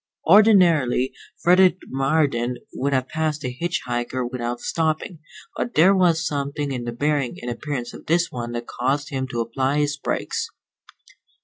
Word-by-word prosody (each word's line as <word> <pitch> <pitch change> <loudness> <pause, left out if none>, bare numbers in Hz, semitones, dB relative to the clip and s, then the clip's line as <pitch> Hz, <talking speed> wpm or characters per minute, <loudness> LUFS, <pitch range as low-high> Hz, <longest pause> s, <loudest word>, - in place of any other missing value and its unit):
Ordinarily 170 - +5 0.3
Frederick 180 +1 +5
Marden 135 -3 0 0.2
would 140 +2 -1
have 130 -1 0
passed 155 -1 -2
a 125 - -2
hitch 170 +7 -2
hiker 120 +1 -2
without 120 -1 -4
stopping, 160 +2 -2 0.4
but 240 - -3
there 180 +5 +6
was 170 -4 +3
something 140 0 -2
in 125 -2 -4
the 120 - -3
bearing 140 +1 -1
and 120 - -4
appearance 125 -1 -4
of - - -12
this 170 +2 +2
one 120 -1 -5
that 120 0 -4
caused 135 +5 -1
him 130 -2 -3
to 120 -3 -2
apply 130 +5 -1
his 145 0 0
brakes. - - -2
140 Hz, 155 wpm, -23 LUFS, 125-160 Hz, 0.4 s, there